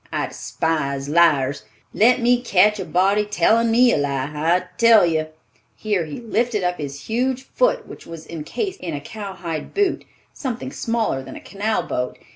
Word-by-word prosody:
I -, -, -1 dB
despise 140 Hz, -4 st, -2 dB
liars. 145 Hz, -5 st, +3 dB, 0.3 s
Let 245 Hz, +4 st, +4 dB
me 245 Hz, +1 st, +3 dB
catch 210 Hz, -2 st, +3 dB
a 190 Hz, -, -3 dB
body 190 Hz, +5 st, +2 dB
telling 220 Hz, +3 st, +2 dB
me 240 Hz, +2 st, +5 dB
a -, -, +2 dB
lie, 140 Hz, -1 st, -1 dB
I 165 Hz, +4 st, +2 dB, 0.2 s
tell 230 Hz, -4 st, +7 dB
you—" 160 Hz, -2 st, 0 dB, 0.5 s
Here 205 Hz, -6 st, -1 dB
he 150 Hz, +5 st, -7 dB
lifted 230 Hz, -2 st, -1 dB
up 180 Hz, -1 st, -1 dB
his 140 Hz, -1 st, -6 dB
huge 255 Hz, -, -1 dB
foot -, -, 0 dB
which -, -, -12 dB
was 165 Hz, -1 st, -9 dB
encased 170 Hz, -, -5 dB
in 170 Hz, -4 st, -4 dB
a -, -, -4 dB
cowhide 180 Hz, -3 st, -6 dB
boot, 400 Hz, -2 st, +1 dB, 0.3 s
something 260 Hz, -1 st, -5 dB
smaller 225 Hz, -, -1 dB
than 130 Hz, 0 st, -10 dB
a -, -, -8 dB
canal 210 Hz, +2 st, -2 dB
boat. 125 Hz, 0 st, -3 dB
190 Hz, 170 wpm, -21 LUFS, 155-230 Hz, 0.5 s, tell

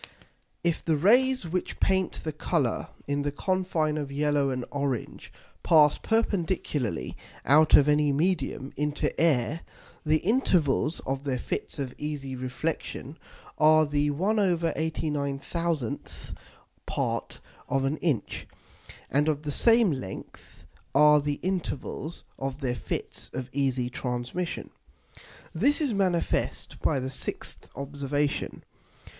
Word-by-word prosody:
_If 170 Hz, -2 st, +1 dB
the 160 Hz, -2 st, +2 dB
Rays 245 Hz, -, +4 dB
which 180 Hz, +2 st, -3 dB
paint 190 Hz, -1 st, +1 dB
the 155 Hz, -, -2 dB
Colour 150 Hz, -4 st, 0 dB, 0.2 s
in 145 Hz, 0 st, 0 dB
the 145 Hz, 0 st, -1 dB
Confine 165 Hz, -2 st, 0 dB
of 140 Hz, -2 st, -4 dB
yellow 145 Hz, -1 st, +1 dB
and 125 Hz, -2 st, -2 dB
orange 140 Hz, -5 st, -3 dB, 0.3 s
pass 150 Hz, -3 st, +5 dB
perpendicularly 175 Hz, -, -1 dB, 0.3 s
out 155 Hz, +3 st, +6 dB
of 145 Hz, -, +6 dB
any 150 Hz, 0 st, +4 dB
Medium 145 Hz, -3 st, 0 dB
into 150 Hz, 0 st, 0 dB
Air, 155 Hz, 0 st, +2 dB, 0.4 s
the 155 Hz, 0 st, +3 dB
Intervals 170 Hz, -, +2 dB
of 135 Hz, +1 st, -3 dB
their 135 Hz, -3 st, -1 dB
Fits -, -, -4 dB
of 135 Hz, -3 st, -3 dB
easy 145 Hz, -3 st, -4 dB
Reflexion 130 Hz, +3 st, -4 dB, 0.4 s
are 155 Hz, 0 st, +6 dB
the 145 Hz, 0 st, +1 dB
1/89000th 160 Hz, -, -1 dB, 0.5 s
part -, -, -2 dB, 0.3 s
of 135 Hz, 0 st, +1 dB
an 145 Hz, +3 st, 0 dB
Inch. 150 Hz, -10 st, -1 dB, 0.6 s
And 145 Hz, +3 st, +2 dB
of 150 Hz, -1 st, -1 dB
the 150 Hz, -, -2 dB
same 230 Hz, -, +5 dB
length 100 Hz, -10 st, -8 dB, 0.3 s
are 150 Hz, 0 st, +7 dB
the 145 Hz, 0 st, -2 dB
Intervals 170 Hz, -3 st, -3 dB, 0.2 s
of 135 Hz, +1 st, -3 dB
their 125 Hz, -2 st, 0 dB
Fits 125 Hz, -, -5 dB
of 130 Hz, -1 st, -5 dB
easy 130 Hz, -3 st, +1 dB
Transmission._ 125 Hz, +9 st, -3 dB, 0.8 s
This 275 Hz, -, +3 dB
is 290 Hz, -7 st, 0 dB
manifest 185 Hz, -4 st, 0 dB
by -, -, +1 dB
the 130 Hz, +1 st, -3 dB
6th 130 Hz, -, -5 dB
Observation. 140 Hz, +1 st, -2 dB
150 Hz, 120 wpm, -27 LUFS, 135-170 Hz, 0.8 s, are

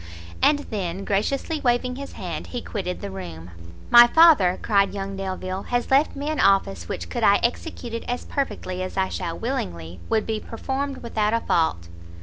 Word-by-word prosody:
And 295 Hz, -, +5 dB
then, 195 Hz, -2 st, -3 dB
graciously 275 Hz, +10 st, -1 dB
waving 250 Hz, 0 st, +1 dB
his 280 Hz, +1 st, -8 dB
hand, -, -, -6 dB
he 245 Hz, -, -5 dB
quitted 185 Hz, -4 st, -4 dB
the 100 Hz, -, -5 dB
room. 85 Hz, -3 st, -8 dB, 0.4 s
"My 240 Hz, 0 st, +10 dB
father," 255 Hz, -, +6 dB
cried 200 Hz, -2 st, +2 dB
young 195 Hz, 0 st, -4 dB
Delvile, 190 Hz, 0 st, -4 dB
"has 245 Hz, +1 st, -1 dB
left 280 Hz, +3 st, +3 dB
me 285 Hz, +1 st, -4 dB
an 310 Hz, -, -3 dB
office 95 Hz, -, +2 dB
which, 85 Hz, -, -4 dB
could 85 Hz, -, -4 dB
I 200 Hz, -, +6 dB
execute 240 Hz, -1 st, -3 dB
it 230 Hz, -, -4 dB
as 245 Hz, 0 st, -3 dB
perfectly 185 Hz, -9 st, -3 dB
as 185 Hz, +1 st, -5 dB
I 190 Hz, 0 st, +1 dB
shall 165 Hz, -, -4 dB
willingly, 90 Hz, -, -4 dB
would 220 Hz, -1 st, +1 dB
be 220 Hz, -1 st, -2 dB
performed 270 Hz, +5 st, -4 dB
without 220 Hz, -2 st, 0 dB
a 230 Hz, -, 0 dB
fault." 160 Hz, -, 0 dB
205 Hz, 180 wpm, -24 LUFS, 185-245 Hz, 0.4 s, My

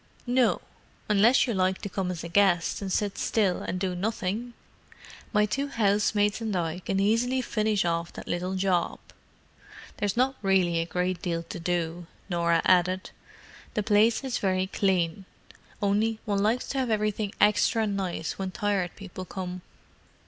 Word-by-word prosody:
"No—unless 240 Hz, -2 st, +2 dB
you 240 Hz, -, -1 dB
like 185 Hz, -1 st, +1 dB
to -, -, -2 dB
come 190 Hz, -1 st, -2 dB
as 175 Hz, -3 st, -4 dB
a -, -, -4 dB
guest 175 Hz, -1 st, +2 dB
and 195 Hz, -1 st, -4 dB
sit 205 Hz, +1 st, -1 dB
still 200 Hz, -5 st, +1 dB
and 180 Hz, -, -3 dB
do 185 Hz, -1 st, -1 dB
nothing. 215 Hz, +4 st, -3 dB, 0.8 s
My 210 Hz, 0 st, +3 dB
two 275 Hz, +7 st, -2 dB
housemaids 210 Hz, -2 st, +1 dB
and 220 Hz, -3 st, -2 dB
I 170 Hz, 0 st, -1 dB
can 195 Hz, +1 st, -2 dB
easily 230 Hz, +6 st, +2 dB
finish 215 Hz, -4 st, 0 dB
off 170 Hz, 0 st, -1 dB
that -, -, -9 dB
little 180 Hz, +2 st, -2 dB
job. 185 Hz, -2 st, +1 dB, 1.0 s
There's 205 Hz, +1 st, -1 dB
not 260 Hz, +2 st, +2 dB
really 185 Hz, -4 st, +2 dB
a 165 Hz, -, -1 dB
great 180 Hz, 0 st, -1 dB
deal 170 Hz, -1 st, -2 dB
to 165 Hz, -, -7 dB
do," 170 Hz, 0 st, -2 dB, 0.2 s
Norah 170 Hz, -1 st, +2 dB
added; 185 Hz, +1 st, +3 dB, 0.6 s
"the 210 Hz, -, +1 dB
place 220 Hz, +4 st, +3 dB
is 260 Hz, -2 st, -2 dB
very 185 Hz, -1 st, +1 dB
clean. 190 Hz, -2 st, 0 dB, 0.6 s
Only 215 Hz, +3 st, +2 dB
one 200 Hz, -2 st, 0 dB
likes 220 Hz, +4 st, +1 dB
to 275 Hz, -, -1 dB
have 255 Hz, -2 st, 0 dB
everything 215 Hz, -1 st, -1 dB
extra 210 Hz, +2 st, +3 dB
nice 195 Hz, -5 st, -3 dB
when 190 Hz, -1 st, -2 dB
Tired 195 Hz, -3 st, -1 dB
People 185 Hz, -2 st, -8 dB
come." 180 Hz, -1 st, -6 dB
195 Hz, 155 wpm, -27 LUFS, 180-215 Hz, 1.0 s, My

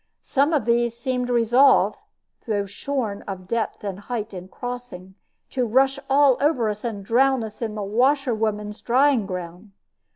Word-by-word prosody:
Some 280 Hz, +2 st, +1 dB
of 290 Hz, -9 st, +1 dB
these 235 Hz, 0 st, +1 dB
seemed 250 Hz, 0 st, -2 dB
resolved 240 Hz, +3 st, +4 dB, 0.5 s
(though 205 Hz, -2 st, 0 dB
shorn 215 Hz, 0 st, -3 dB
of 185 Hz, -2 st, -6 dB
depth 230 Hz, 0 st, -2 dB
and 195 Hz, -2 st, -4 dB
height 220 Hz, 0 st, -5 dB
in 180 Hz, -1 st, -8 dB
crossing) 245 Hz, -5 st, -7 dB, 0.4 s
to 250 Hz, -2 st, 0 dB
rush 270 Hz, +4 st, +2 dB
all 275 Hz, -1 st, +5 dB
over 270 Hz, -7 st, +2 dB
us 210 Hz, 0 st, -5 dB
and 210 Hz, -5 st, -4 dB
drown 260 Hz, +2 st, +3 dB
us 215 Hz, +1 st, -9 dB
in 220 Hz, -2 st, -3 dB
the 210 Hz, -, -3 dB
washer 255 Hz, +5 st, +2 dB
women's 210 Hz, -1 st, -3 dB
drying 255 Hz, -3 st, +3 dB
ground. 180 Hz, +2 st, -7 dB
235 Hz, 160 wpm, -23 LUFS, 205-260 Hz, 0.5 s, all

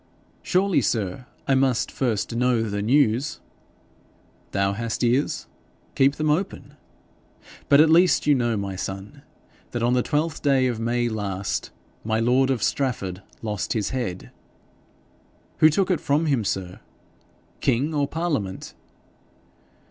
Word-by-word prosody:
'Surely, 190 Hz, 0 st, +2 dB
sir, 110 Hz, +2 st, -2 dB, 0.2 s
I 135 Hz, -, +3 dB
must 130 Hz, -2 st, +1 dB
first 115 Hz, -3 st, -1 dB
know 125 Hz, -1 st, +2 dB
the 100 Hz, -2 st, -2 dB
news.' 125 Hz, +2 st, +2 dB, 1.1 s
'Thou 100 Hz, 0 st, +1 dB
hast 115 Hz, +3 st, -3 dB
ears; 125 Hz, +4 st, +1 dB, 0.5 s
keep 135 Hz, +1 st, +3 dB
them 155 Hz, 0 st, +1 dB
open. 180 Hz, +6 st, -3 dB, 1.0 s
But 140 Hz, +1 st, +7 dB
at 160 Hz, -, +5 dB
least 175 Hz, +1 st, +4 dB
you 150 Hz, -, +5 dB
know, 120 Hz, -4 st, +1 dB
my 100 Hz, -1 st, -4 dB
son, 95 Hz, +1 st, -6 dB, 0.5 s
that 120 Hz, -1 st, -3 dB
on 120 Hz, +1 st, +2 dB
the 125 Hz, -, +3 dB
twelfth 155 Hz, +4 st, -1 dB
day 135 Hz, -2 st, +3 dB
of 120 Hz, -3 st, -1 dB
May 120 Hz, +1 st, 0 dB
last 100 Hz, -4 st, -3 dB, 0.3 s
my 110 Hz, 0 st, 0 dB
lord 125 Hz, +3 st, +3 dB
of 130 Hz, -6 st, 0 dB
Strafford 100 Hz, -9 st, -1 dB, 0.2 s
lost 105 Hz, -3 st, -2 dB
his 105 Hz, -4 st, -1 dB
head.' 110 Hz, -9 st, -4 dB, 1.3 s
'Who 155 Hz, -, +7 dB
took 185 Hz, +5 st, +1 dB
it 180 Hz, -, 0 dB
from 145 Hz, +3 st, +1 dB
him, 135 Hz, -7 st, +1 dB
sir? 95 Hz, -2 st, -3 dB, 0.8 s
King 140 Hz, +7 st, +1 dB
or 145 Hz, -2 st, +1 dB
parliament?' 145 Hz, -, -3 dB
125 Hz, 135 wpm, -24 LUFS, 105-145 Hz, 1.3 s, But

